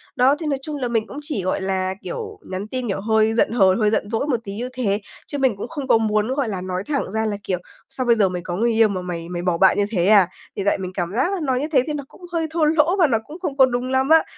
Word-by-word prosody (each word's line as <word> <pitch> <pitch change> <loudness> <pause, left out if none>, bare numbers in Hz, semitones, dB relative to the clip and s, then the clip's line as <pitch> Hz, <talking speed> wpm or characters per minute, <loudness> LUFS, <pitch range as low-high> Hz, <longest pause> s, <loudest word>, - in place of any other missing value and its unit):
Đó, 260 +3 +4
thì 325 - -5
nói 280 -3 0
chung 300 +2 -5
là 255 -3 -2
mình 225 -2 0
cũng 285 - -7
chỉ, 290 - -4
gọi 185 - -1
là, 190 -1 -1
kiểu, 435 -4 -6
nhắn 190 +2 -4
tin, 255 +1 -3
kiểu, 195 -1 -2
hơi 220 +1 +2
giận 225 - +2
hờn, 195 -3 +4
hơi 215 -1 +3
giận 210 -1 -1
dỗi 225 +5 -1
một 260 -5 +1
tí 200 - -6
như 245 +4 -4
thế, 215 -5 -1 0.3
chứ 285 - -4
mình 265 -5 +2
cũng - - -5
không 290 -5 -6
có - - +5
muốn, 215 -1 +1
gọi 275 -5 0
là, 190 -3 -3
nói 185 0 -3
thẳng 280 -9 -1
ra 220 +1 0
là, 210 -2 -1
kiểu, 185 -2 -1 0.3
"Sao 255 - -3
bây 235 -1 +5
giờ 205 -4 +3
mày 180 -1 -4
có 175 0 -4
người 235 +5 +1
yêu 225 0 +5
mà 190 -2 -3
mày 170 -2 -5
mày 175 -1 -3
bỏ 175 -1 0
bạn 190 +2 +5
như 205 - +3
thế 180 -6 +1
à?" 200 -4 +6 0.3
Thì 200 - -2
tại 200 - +3
mình 185 -1 -5
cảm 175 -2 -2
giác 270 +11 +1
là 390 - -2
nói 260 -3 +1
như 295 - -2
thế 260 -5 +4
thì 305 - -2
nó 290 -1 -4
cũng - - -19
hơi 330 -2 -1
thô 320 -1 +2
lỗ 315 +3 +3
và 340 - +6
nó 235 -5 +2
cũng 315 +4 -10
không 285 -7 -3
có 265 - +8
đúng 250 0 -2
lắm 265 +1 +1
á. 320 0 +7
225 Hz, 315 wpm, -22 LUFS, 195-275 Hz, 0.3 s, có